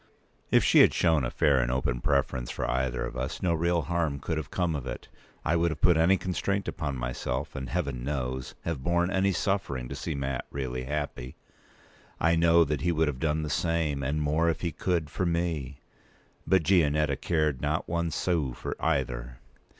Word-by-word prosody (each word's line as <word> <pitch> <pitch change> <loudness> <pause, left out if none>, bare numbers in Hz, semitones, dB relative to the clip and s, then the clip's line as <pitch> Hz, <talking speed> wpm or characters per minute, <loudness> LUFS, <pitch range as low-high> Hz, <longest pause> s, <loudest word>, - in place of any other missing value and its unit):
If - - +4
she - - +5
had - - +6
shown 80 -5 +3
a - - 0
fair 70 0 +3
and - - +1
open 65 -1 -1
preference 70 -4 0
for - - -3
either 65 -1 -1
of - - -7
us, 65 +1 -4
no 90 -2 +2
real 85 0 +1
harm 85 -5 -1
could 80 +3 -3
have 75 -2 -4
come 85 -2 0
of 70 -3 -4
it. - - -6 0.4
I 80 - +2
would 85 0 +2
have 80 -2 -5
put 90 -1 +5
any 85 +4 +4
constraint 100 +2 -2
upon 70 -3 -3
myself, 60 +2 -3
and, 65 - -5
Heaven 70 -9 -2
knows! 65 -2 -3
have 85 -5 -3
borne 85 +3 +1
any 95 0 +2
suffering, 85 -9 -1
to - - -5
see - - -4
Mat 70 -2 -2
really 65 -2 -4
happy. 70 -3 -4 0.8
I 85 +1 +3
know 85 0 +5
that 75 -3 -2
he 85 - +1
would 80 -2 +2
have 65 -3 -5
done 75 +1 0
the 75 - -3
same, 80 -2 0
and 75 +3 -1
more 80 +3 +2
if 80 - -2
he 85 - -1
could, 85 -3 -1
for 95 - -1
me. 80 -6 -2 0.7
But 95 -3 +4
Gianetta 75 -4 +3
cared 75 -6 0
not 75 +2 -1
one 85 0 -1
sou 80 -6 0
for - - -5
either. 60 -6 -1
75 Hz, 195 wpm, -28 LUFS, 65-85 Hz, 0.8 s, had